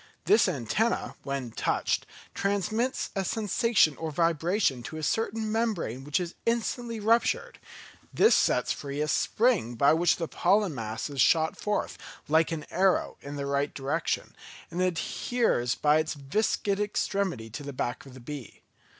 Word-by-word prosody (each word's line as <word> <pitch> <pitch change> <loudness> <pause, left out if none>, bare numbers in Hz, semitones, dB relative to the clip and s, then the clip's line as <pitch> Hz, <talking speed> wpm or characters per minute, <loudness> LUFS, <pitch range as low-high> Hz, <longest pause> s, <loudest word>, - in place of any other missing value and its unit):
This 420 - +5
antenna, 165 - -1
when 135 -4 -4
touched, - - -1 0.3
transmits 215 +6 -1
a 195 - 0
sensation 210 -4 +2
or 160 - -3
vibration 165 - +1
to 155 +5 -7
a 155 - -6
certain 225 +3 -1
membrane 210 - -1
which 145 +3 0
is 175 -1 -4
instantly 230 0 -1
ruptured; 225 +3 +1 0.5
this 440 - +5
sets - - +2
free 140 0 -4
a 150 - 0
spring 210 - +1
by 140 +5 +5
which 170 +2 +3
the 165 - -3
pollen 195 +1 +2
mass 110 -3 -4
is 140 -3 -1
shot 160 +4 +3
forth, 210 0 -2 0.3
like 160 +2 +3
an 155 -2 -4
arrow, 190 +1 +2
in 140 +1 -7
the 140 -1 -3
right 140 +1 -1
direction, 145 +4 -2 0.4
and 175 +2 -2
adheres 180 - 0
by 150 +1 +3
its 155 0 -2
viscid 200 +7 0
extremity 195 - -1
to 145 - -6
the 140 0 -6
back 125 -2 -3
of 130 - -13
the - - -10
bee. 135 0 -9
165 Hz, 155 wpm, -28 LUFS, 140-210 Hz, 0.5 s, This